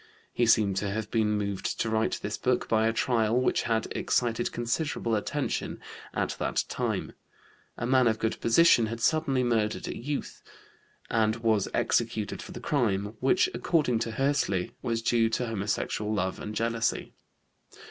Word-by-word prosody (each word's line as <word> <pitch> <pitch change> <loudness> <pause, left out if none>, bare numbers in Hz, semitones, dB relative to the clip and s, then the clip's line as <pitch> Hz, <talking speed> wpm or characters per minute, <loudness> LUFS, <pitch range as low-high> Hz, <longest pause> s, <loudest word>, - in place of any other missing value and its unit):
He 120 - +2
seems 100 -4 +3
to 100 - -2
have 110 +1 -4
been 110 -2 +2
moved 100 -2 -3
to - - 0
write 110 0 0
this 105 +1 -2
book 125 -1 0
by 110 0 +2
a - - +3
trial 115 0 +1
which 130 - +1
had 110 -1 +1
excited 120 -1 0
considerable 120 0 -2
attention 105 - -2 0.3
at - - -2
that - - 0
time. - - -2 0.7
A 120 - -3
man 130 0 +4
of 110 -1 +2
good 110 0 -2
position 120 -1 +5
had 115 +1 -5
suddenly 140 -1 +2
murdered 110 -3 0
a - - -4
youth, 145 +4 -5 0.7
and 110 -1 +2
was 110 -3 +1
executed 115 -3 0
for - - -10
the - - -7
crime, 105 -6 0
which, 135 +8 +3
according 145 -9 +1
to 115 - -2
Hössli, 135 -9 0
was 115 -1 -2
due 115 -1 +3
to 125 +2 -1
homosexual 105 -1 -2
love 95 -3 -1
and 105 0 -6
jealousy. 115 0 -1
115 Hz, 160 wpm, -28 LUFS, 110-120 Hz, 0.7 s, position